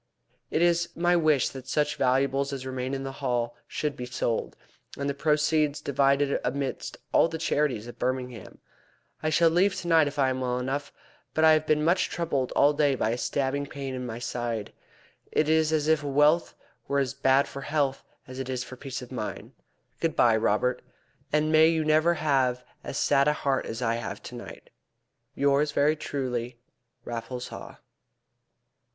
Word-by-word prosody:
It 165 - +1
is 170 0 +2
my 175 +1 +2
wish 155 -5 +3
that 130 -1 -10
such 150 +3 0
valuables 135 +2 +1
as 135 -2 -5
remain 130 +1 -3
in 135 - -4
the 135 - -4
Hall 120 -3 -1
should 150 -2 -3
be 125 - -6
sold, 120 -2 -2 0.4
and 140 - -2
the 140 - 0
proceeds 150 0 +1
divided 140 0 +2
amidst 140 -1 -3 0.2
all - - +5
the 165 - -5
charities 145 -8 0
of 120 - -11
Birmingham. 125 -2 -3 0.6
I 155 - 0
shall 165 +1 +4
leave 185 +4 +3
tonight 165 -3 +3
if 145 - -6
I 135 -2 +3
am 130 0 -3
well 125 -1 -1
enough, 135 +3 -3 0.4
but 160 - +2
I 160 - +8
have 155 0 +3
been 150 0 +2
much 175 +3 +2
troubled 145 -7 -1
all 145 +1 +4
day 145 -2 +2
by 115 - 0
a - - 0
stabbing 140 +2 -1
pain 140 -2 -6
in 130 0 -4
my 115 -2 -5
side. 120 -3 -4 0.6
It 155 - +2
is 160 0 +3
as 155 -1 +1
if 160 -1 +3
wealth 150 +4 +3 0.3
were 140 - 0
as 135 -3 0
bad 135 0 +3
for 140 - -8
health 140 -2 -1 0.2
as 130 0 -8
it 130 -1 -4
is 125 -1 -2
for 130 - -10
peace 130 -1 -6
of 125 - -12
mind. 110 -5 -5 0.5
Good 165 -1 -1
bye, 115 -2 +5
Robert, 115 +3 +1 0.5
and 150 +1 +2
may 160 0 +7
you 160 -1 +1
never 155 +3 +3
have 130 -5 +1 0.2
as - - -5
sad 140 +1 +3
a 150 - +4
heart 140 -2 -1
as 115 +2 -4
I 115 0 +1
have 115 - -6
to - - -9
night. - - -10 0.6
Yours 140 +1 +2
very 150 +2 +3
truly, 125 -5 -4 0.5
RAFFLES 120 +1 -5
HAW." - - -9
140 Hz, 180 wpm, -27 LUFS, 125-155 Hz, 0.6 s, I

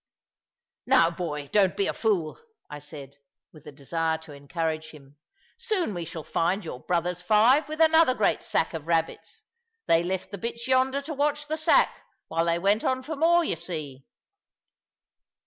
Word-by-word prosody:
"Now, 170 0 +5
boy, 165 -4 -4
don't 195 -3 +3
be 200 - +1
a - - -1
fool," 190 -9 -1 0.3
I 150 - -6
said, 145 -2 -11 0.4
with 155 -3 -16
the 150 - -9
desire 160 +3 -2
to 155 -2 -12
encourage 160 +2 -4
him; 145 -2 -16 0.4
"soon 425 - -1
we 175 -2 -5
shall 160 0 -7
find 180 +6 -1
your 125 - -6
brothers 175 +3 -2
five, 230 - +4
with 310 +1 -6
another 320 -4 +5
great 210 -5 +1
sack 160 - -1
of 160 -1 -6
rabbits. 165 -1 -2 0.4
They 165 0 +4
left 185 +2 -4
the 200 - -6
bitch 235 +3 -5
yonder 260 +1 +2
to 310 +2 -5
watch 295 +1 -1
the 310 - -1
sack, 315 0 +3 0.3
while 165 +1 0
they 170 0 +1
went 200 +5 +1
on 260 0 0
for 315 +4 -5
more, 340 +3 +4
you 315 - -1
see." 155 -6 -7
175 Hz, 170 wpm, -26 LUFS, 160-260 Hz, 0.4 s, Now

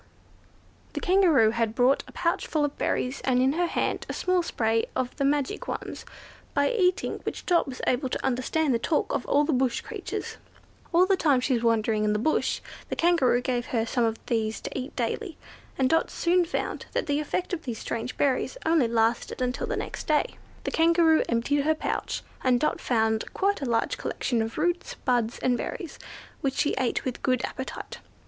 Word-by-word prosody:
The - - -2
Kangaroo 340 - +4
had 230 -1 -1
brought 255 +2 +3
a - - -12
pouch 335 -1 -1
full 305 -2 +1
of 290 - -4
berries, 255 +2 -1
and 255 -1 +2
in 260 +2 +3
her 350 +2 +1
hand - - -1
a - - -2
small 365 -1 +1
spray 225 -8 0
of 255 -1 -2
the - - 0
magic 280 -1 0
ones, - - -5 0.5
by - - +3
eating 370 -6 +1
which - - -5
Dot 345 -4 +3
was 260 -1 -7
able 255 +1 +1
to - - -3
understand 265 +3 +1
the 230 - +1
talk 300 +6 0
of - - -2
all 290 - +4
the 300 +1 0
bush 255 -1 +1
creatures. - - -5 0.5
All 350 +1 +5
the 390 +1 +3
time 295 -8 +3
she 255 +1 0
was 235 - +1
wandering 225 -2 +2
in 210 0 +2
the - - +1
bush 310 +9 0 0.3
the - - -2
Kangaroo 330 -8 +3
gave 245 -2 -1
her 225 -2 0
some 240 +1 0
of 225 -1 +1
these 220 -2 -1
to - - -6
eat 260 +2 -5
daily, 315 - -2 0.4
and 265 - +3
Dot 325 +4 +2
soon 355 +1 +2
found 330 - -3
that - - 0
the 290 0 0
effect 350 +5 -2
of 330 -3 -3
these 240 -4 -3
strange 230 +3 -4
berries 280 - +1
only 320 -6 +4
lasted 230 0 0
until 250 0 -1
the - - -2
next - - -5
day. 305 -2 +1 0.3
The - - -2
Kangaroo 330 -1 +4
emptied 240 +5 +1
out 280 - 0
her 315 0 +3
pouch, - - -3 0.2
and 250 -2 +3
Dot 305 - 0
found 220 -2 +1
quite 400 -3 +1
a - - -1
large 230 -1 0
collection 240 -3 -1
of 225 +1 -4
roots, 350 +3 -1
buds, 240 -3 0
and 250 -1 +3
berries, 360 - -5 0.4
which 270 -1 -1
she 290 - +1
ate 255 -3 0
with 255 -2 -3
good 255 -2 +1
appetite. 260 - -7
265 Hz, 200 wpm, -27 LUFS, 235-320 Hz, 0.5 s, All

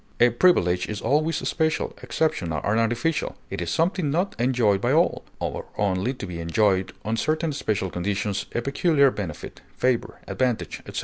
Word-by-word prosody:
A 120 0 +6
privilege 90 - +3
is 105 -1 -3
always 150 +8 +1
special, 160 -1 0
exceptional, 85 - -1
and 105 +3 +2
artificial; 120 +8 0 0.2
it - - -3
is 85 - -2
something 165 - +1
not 175 +7 0
enjoyed 120 -5 +2
by 120 - +1
all, 165 +4 +2 0.2
or - - -3
only 100 +3 +1
to 115 - -6
be 90 -3 -6
enjoyed 95 +3 +1
on 110 +1 -1
certain 155 +4 0
special 100 -8 -1
conditions, 100 +3 -2
a 120 - 0
peculiar 140 0 +3
benefit, 90 -10 -6 0.2
favor, 125 -2 0
advantage, 125 -3 -1
etc. - - -4
120 Hz, 165 wpm, -24 LUFS, 100-150 Hz, 0.2 s, A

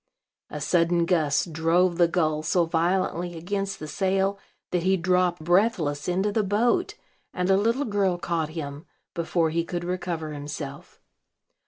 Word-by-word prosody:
A 150 - -6
sudden 170 +2 +2
gust 165 -2 +1
drove 170 +2 +2
the 175 - +6
gull 155 -3 0
so 170 +2 +2
violently 175 +1 0
against 195 +3 -3
the 155 - -6
sail 195 +4 0 0.3
that 180 - +1
he 190 +2 +2
dropped 180 -1 +1
breathless 175 -5 +1
into 190 +3 +1
the 220 - +1
boat; 230 - +1 0.4
and 180 +1 +1
a - - +6
little 230 +8 +1
girl 200 -4 +1
caught 170 -3 -2
him, 150 0 -7 0.3
before 165 -1 0
he 170 +1 0
could 175 +1 -4
recover 175 -3 -3
himself. 145 -1 -7
175 Hz, 150 wpm, -25 LUFS, 160-190 Hz, 0.4 s, the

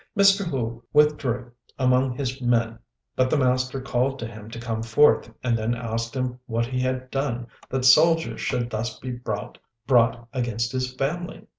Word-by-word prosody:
Mr. 200 0 +5
Hu 120 -8 -3
withdrew 140 -5 +2 0.3
among 130 -1 +2
his 130 -1 -3
men, 115 -2 +1 0.4
but 130 0 +2
the 155 - +2
master 130 0 +1
called 130 0 0
to 115 - -5
him 110 -1 -9
to 115 0 -8
come 115 -2 -3
forth, 115 +6 +4
and 120 -2 +2
then 115 +1 0
asked 115 0 -4
him 125 -1 -2
what 115 0 0
he 125 +1 -3
had 130 0 -2
done 135 -3 -2 0.2
that 130 -1 -1
soldiers 165 +5 +5
should 125 -2 0
be - - -5
thus 110 0 -4 0.9
brought 120 -2 +3
against 115 -3 -1
his 130 -1 -2
family. 155 +8 -3
125 Hz, 165 wpm, -24 LUFS, 115-135 Hz, 0.9 s, Mr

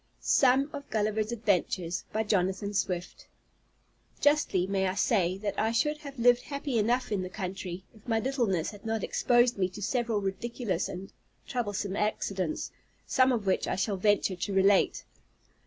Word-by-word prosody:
SOME 265 +1 +4
OF 285 -1 -7
GULLIVER'S 215 0 0
ADVENTURES 185 -6 0
By 220 - 0
Jonathan 200 0 0
Swift 180 -3 -3 0.9
Justly 290 -11 +3
may 190 0 0
I 185 - -2
say, 190 -4 +2
that 200 0 -3
I 220 - +2
should 300 +6 +1
have 280 -2 -9
lived 245 +1 +5
happy 280 -4 -2
enough 240 +4 +1
in 200 -3 0
the 185 - -4
country, 185 -2 -5
if 220 +1 -20
my 225 -1 +2
littleness 230 - 0
had 205 -2 -13
not 225 -1 -2
exposed 240 -2 +2
me 185 -1 +2
to 205 - -10
several 235 -1 0
ridiculous 195 -1 -2
and 190 +2 -8 0.3
troublesome 205 -5 -2
accidents; 195 -5 -2 0.3
some 260 0 +3
of 230 -5 -1
which 190 - +1
I - - 0
shall 195 +2 0
venture 205 -1 +2
to 180 +3 -3
relate. 195 +1 +3
210 Hz, 160 wpm, -29 LUFS, 190-240 Hz, 0.9 s, lived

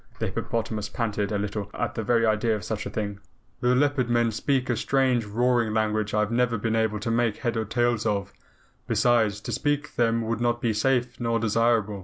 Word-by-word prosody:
The - - -2
hippopotamus 110 -2 -3
panted 105 -2 -2
a 105 - 0
little 100 0 -3
at 115 0 -2
the 115 - -3
very 115 +1 +2
idea 110 +1 +2
of 105 - -6
such 110 -2 -3
a - - -4
thing. 100 -2 -4 0.4
"The 125 +1 +2
Leopard 140 -2 +1
Men 120 -1 +2
speak 130 +3 0
a 120 - +1
strange 130 -1 +1
roaring 115 +1 +1
language 110 -1 0
I 105 - +3
have 105 +1 -1
never 120 -1 +1
been 110 +1 -1
able 110 -1 0
to 115 - -2
make 115 -2 +1
head 120 -2 -2
or 110 -1 -1
tail 120 +2 +1
of. 100 -2 -1 0.5
Besides, 110 -4 +2
to - - -5
speak 145 0 -1
to - - -29
them 115 -1 +2
would 115 +1 -2
not 120 0 +1
be 115 -2 0
safe 125 +2 0
nor 115 -1 0
desirable. 115 -2 +1
115 Hz, 215 wpm, -26 LUFS, 105-120 Hz, 0.5 s, I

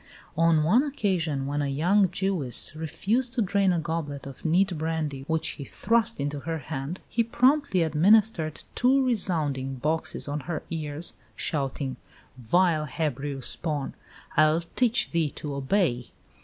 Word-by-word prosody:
On 165 -1 +3
one 205 +11 +4
occasion, 185 - -1
when 145 +1 -1
a 145 - -1
young 180 +8 +3
Jewess 180 -8 +2
refused 220 - -1
to 240 - +1
drain 200 0 +2
a 175 - +1
goblet 160 -4 -4
of 135 -1 -10
neat 180 +3 +2
brandy 155 -4 -3
which 160 0 0
he 140 - -7
thrust 230 +7 0
into 145 +1 -2
her 165 +3 -3
hand, 145 +3 -5
he 230 - +1
promptly 250 - +2
administered 165 0 +3
two 265 +2 +3
resounding 155 - 0
boxes 155 +6 -2
on 145 +1 -2
her 170 - -3
ears, 155 0 -3 0.2
shouting, 135 -2 -2 0.4
"Vile 155 +6 +2
Hebrew 145 -2 -3
spawn! 150 0 -2 0.4
I'll 155 +2 +4
teach 245 -2 +2
thee 165 -3 +1
to 145 -2 -5
obey." 135 -3 0
160 Hz, 140 wpm, -26 LUFS, 145-195 Hz, 0.4 s, one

